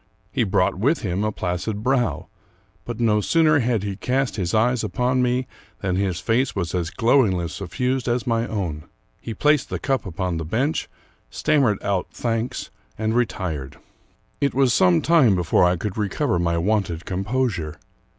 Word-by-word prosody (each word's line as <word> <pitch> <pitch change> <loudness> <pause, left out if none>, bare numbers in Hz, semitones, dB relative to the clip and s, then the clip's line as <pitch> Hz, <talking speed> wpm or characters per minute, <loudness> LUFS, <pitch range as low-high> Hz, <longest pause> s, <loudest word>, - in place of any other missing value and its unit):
He 125 - +1
brought 95 -3 +1
with 140 +10 +2
him 95 0 -1
a 110 - 0
placid 100 +3 -3
brow; 120 - 0 0.6
but 120 -1 -5
no 105 -3 +3
sooner 155 - +3
had 120 -5 0
he 100 -1 -3
cast 130 +5 -1
his 90 -4 -2
eyes 115 +2 +2
upon 125 0 0
me 125 +1 +1 0.4
than 95 -2 0
his 95 -3 0
face 125 +4 0
was 90 -4 -2
as 85 -2 -1
glowingly 110 -6 +2
suffused 125 +8 -2
as 120 +1 0
my 115 -1 0
own. 85 -8 -3 0.3
He 115 - -6
placed 150 -2 +2
the - - -2
cup 135 -6 -1
upon 90 -1 -2
the 80 - -3
bench, 125 - -1 0.4
stammered 135 - +2
out 95 -3 0
thanks, 115 0 -3 0.3
and 110 +1 -1
retired. 90 - -2 0.6
It 140 -2 0
was 135 -3 +3
some 90 -6 +4
time 150 - +5
before 90 0 +3
I 90 0 +2
could 105 +3 -4
recover 105 - 0
my 85 -1 +1
wonted 90 -2 0
composure. 95 - -2
110 Hz, 165 wpm, -23 LUFS, 90-125 Hz, 0.6 s, time